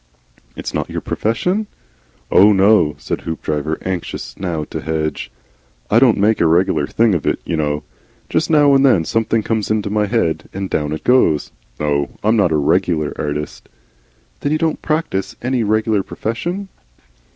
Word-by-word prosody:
"It's - - -6
not - - -2
your - - -3
profession? 180 - -1 0.6
"Oh, 100 +3 +7
no," 95 -6 +4
said - - -4
Hoopdriver, 80 -1 -3
anxious 95 -2 -4
now 85 -5 -3
to - - -6
hedge. 80 -1 -3 0.6
"I 110 - +6
don't 125 -3 +4
make 105 +2 +2
a 85 - +4
regular 80 -3 +2
thing 115 -2 +2
of 85 - -1
it, - - +1
you 85 - -2
know. 75 -1 -1 0.4
Jest - - 0
now 145 -3 +5
and 135 0 +4
then 110 -12 +4
something 115 +1 0
comes 110 -2 -1
into 105 -2 -1
my 105 0 +1
head 85 -9 -1
and 95 -1 -4
down 75 -1 -1
it 80 - -4
goes. 125 - +3 0.3
No 70 -1 -1
I'm 110 +2 +3
not 100 -6 +3
a 80 - +2
regular 75 +1 +1
artist." 75 0 -5 0.7
"Then 145 - -2
you 155 - +2
don't 160 0 -1
practise 155 - -2
any 125 -1 0
regular 110 -1 +1
profession?" 175 - -4
100 Hz, 165 wpm, -18 LUFS, 80-115 Hz, 0.7 s, Oh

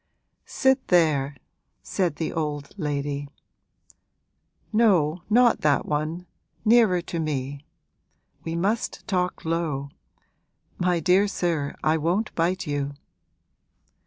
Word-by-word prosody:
'Sit 265 0 +1
there,' 150 -6 +2 0.5
said 180 -5 -1
the 160 - -3
old 150 -3 -3
lady; 145 -4 -3 1.5
'no, 180 -8 +3
not 240 +2 +4
that 145 -2 +2
one, 155 +4 -2 0.4
nearer 215 -6 +5
to 170 - -4
me. 140 -2 -3 0.8
We 165 0 -3
must 205 +7 -1
talk 180 -5 -1
low. 160 -4 -1 0.9
My 180 -1 +2
dear 185 +5 +4
sir, 165 -7 -1
I 155 +1 +3
won't 175 +8 0
bite 175 +3 0
you!' 145 -1 -2
165 Hz, 100 wpm, -25 LUFS, 145-185 Hz, 1.5 s, nearer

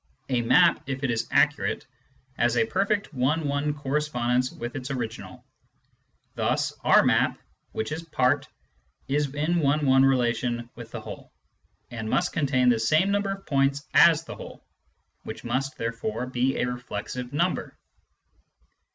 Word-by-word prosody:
A 125 -2 +1
map, 170 +9 +4
if 135 0 -4
it 130 - +1
is 115 -1 -1
accurate, 150 0 +1 0.5
has 120 -1 +1
a 115 - +4
perfect 200 - -1
one 145 +4 0
one 140 +1 0
correspondence 130 -4 0
with 120 +2 -7
its 130 -1 -5
original; 120 -4 -6 0.9
thus - - 0
our - - +6
map, - - +2 0.3
which 110 - -3
is 155 +2 -3
part, 145 -4 +1 0.6
is 145 0 0
in 160 +4 +1
one 145 0 +2
one 135 0 +5
relation 120 -2 +1
with - - -10
the - - -7
whole, - - -10 0.6
and 110 -2 -5
must 175 +8 +1
contain 130 -5 +2
the 120 -2 +3
same 155 - +2
number 200 0 0
of 195 0 -11
points 140 +1 +1
as 165 -2 +6
the - - -8
whole, - - -11 0.6
which - - -8
must 135 +2 -2
therefore 115 0 -3
be 130 +1 0
a - - +1
reflexive 125 0 -5
number. 170 +5 -1
135 Hz, 150 wpm, -26 LUFS, 125-150 Hz, 0.9 s, our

